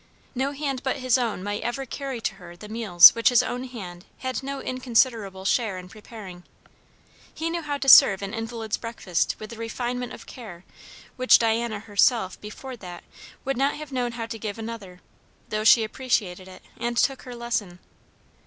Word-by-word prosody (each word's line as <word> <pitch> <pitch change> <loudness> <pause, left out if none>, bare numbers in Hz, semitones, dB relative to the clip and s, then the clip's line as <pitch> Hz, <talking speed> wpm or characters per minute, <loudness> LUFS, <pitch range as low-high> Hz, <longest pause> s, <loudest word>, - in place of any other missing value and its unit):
No 265 +2 -1
hand 275 -3 -3
but 265 -1 -1
his 255 -3 +1
own 225 -6 -2
might 205 +1 -3
ever 255 +3 -3
carry 270 -1 -5
to - - -1
her 175 0 -11
the 210 - -10
meals 215 -6 +8
which 230 - +3
his 245 -2 +4
own 250 +1 -4
hand 185 -8 -9
had 260 0 -3
no 275 +1 -5
inconsiderable 230 -6 0
share 215 -2 +1
in 180 0 -9
preparing. 210 -4 -11 0.9
He 330 +1 -3
knew 340 0 -2
how 295 -2 -3
to 275 - -5
serve 200 -6 +8
an 200 +2 -5
invalid's 225 -1 -4
breakfast 230 -7 -2
with 215 +1 -9
a - - -10
refinement 245 +2 -4
of - - -10
care 195 -8 -11 0.5
which 255 0 +6
Diana 225 -2 0
herself 205 -2 +1
before 250 +5 -8
that 180 -4 -10 0.4
would 270 -1 -1
not 275 +2 +1
have 300 -1 -9
known 245 -2 -2
how 235 -1 -4
to 225 0 -7
give 210 -1 -5
another, 220 -5 -8 0.5
though 215 0 -2
she 225 +1 +7
appreciated 215 -6 -2
it 185 -1 -13
and 235 0 -3
took 270 +1 +2
her 250 -1 -9
lesson. 230 -7 -3
230 Hz, 180 wpm, -25 LUFS, 205-255 Hz, 0.9 s, meals